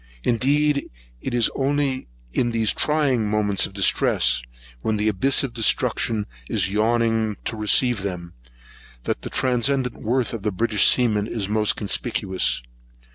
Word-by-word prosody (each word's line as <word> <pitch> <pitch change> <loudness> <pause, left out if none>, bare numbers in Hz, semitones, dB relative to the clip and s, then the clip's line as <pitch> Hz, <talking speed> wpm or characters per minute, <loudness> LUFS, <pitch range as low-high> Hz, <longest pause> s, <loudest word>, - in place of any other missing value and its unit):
Indeed 140 +4 +1 0.3
it - - -3
is 120 -2 +2
only 135 -1 -1 0.3
in 120 - +1
these 115 -2 0
trying 135 -8 +1
moments 105 -2 +1
of - - -16
distress, 100 -1 +2 0.4
when 110 -1 -1
the 105 +1 0
abyss 130 +8 +3
of 130 -4 -4
destruction 110 -1 0 0.2
is 95 - 0
yawning 110 0 +1
to - - -2
receive 110 +1 +2
them, 90 -3 -5 0.7
that - - -3
the - - -6
transcendent 130 0 0
worth 120 +1 0
of 115 -4 -6
a 105 - +1
British 105 +1 +2
seaman 110 -4 +2
is 110 -4 -3
most 105 0 +1
conspicuous. 100 - 0
115 Hz, 140 wpm, -22 LUFS, 105-125 Hz, 0.7 s, abyss